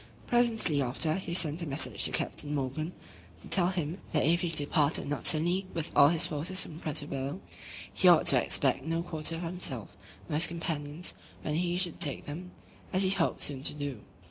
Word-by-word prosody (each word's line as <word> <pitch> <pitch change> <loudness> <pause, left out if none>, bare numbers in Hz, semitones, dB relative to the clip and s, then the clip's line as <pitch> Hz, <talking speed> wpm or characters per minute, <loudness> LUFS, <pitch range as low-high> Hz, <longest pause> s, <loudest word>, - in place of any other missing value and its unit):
Presently 225 -11 +2
after, 135 +5 -1
he 175 -1 -4
sent 165 -1 +2
a 170 - -4
message 140 +2 +1
to - - +4
Captain 150 0 -3
Morgan, 145 +5 -4 0.5
to - - -9
tell 175 -3 +4
him, 175 -1 -3
"that 150 -4 +2
if 170 +3 +2
he 175 - -1
departed 150 -2 +1
not 145 -4 -1
suddenly 175 +5 +2
with 165 -2 -4
all 140 - +7
his 165 +2 +3
forces 165 +4 0
from 160 -1 -10
Puerto 150 -2 -2
Bello, 135 0 -5 0.5
he - - +2
ought - - +6
to - - +7
expect - - +1
no 165 +2 -2
quarter 165 -1 -3
for 170 +1 -5
himself, 165 - -3 0.3
nor 150 - -2
his 165 +2 +6
companions, 165 -1 -3 0.3
when 150 - -3
he 175 +2 -1
should 180 -3 -1
take 150 -6 +2
them, 170 +5 -8 0.4
as 185 +1 +3
he 190 - +2
hoped 185 -4 0
soon 140 -3 +1
to 145 - 0
do." 145 -5 -5
160 Hz, 195 wpm, -29 LUFS, 145-175 Hz, 0.5 s, all